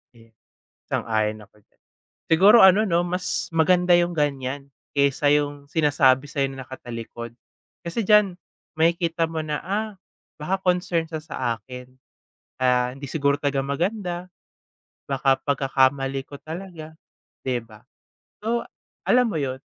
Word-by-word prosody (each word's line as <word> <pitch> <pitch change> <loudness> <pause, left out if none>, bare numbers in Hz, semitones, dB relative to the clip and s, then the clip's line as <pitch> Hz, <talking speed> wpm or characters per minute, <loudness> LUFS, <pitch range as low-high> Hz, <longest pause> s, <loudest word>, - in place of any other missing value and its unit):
Eh, 115 -1 -20 0.5
sang-ayon 110 -1 -1
ako 105 - -18
diyan. - - -43 0.5
Siguro 195 +8 +7
ano 190 +3 +7
'no, 170 -4 +2
mas 180 +1 -2
maganda 180 +2 +3
yung 175 0 +1
ganyan, 140 -2 -2 0.3
kaysa 140 +1 +3
yung 145 -1 -1
sinasabi 145 -3 +3
sa 145 -2 -2
'yo 135 - -1
na 135 0 -7
nakatalikod. 120 -2 -8 0.5
Kasi 180 +6 -3
diyan, 210 -3 +4 0.4
makikita 165 0 +2
mo 160 -1 -3
na, 150 -1 -2
ah, 210 +4 -2 0.5
baka 185 +6 -2
concern 180 -3 0
siya 160 -2 -5
sa - - -8 0.2
akin. 125 +3 -11 0.7
Kaya 125 -1 +2
hindi 140 +1 -7
siguro 140 -2 +1
talaga 140 -2 0
maganda. 175 +6 -2 0.9
Baka 135 -1 +2
pagkakamali 135 0 +1
ko 140 - -9
talaga, 160 0 -8 0.5
'di 125 -2 -1
ba? 110 -2 -17 0.6
So, 230 +2 -1 0.4
alam 250 -1 +4
mo 170 - -2
yun, 130 -1 -3
145 Hz, 135 wpm, -24 LUFS, 135-175 Hz, 0.9 s, Siguro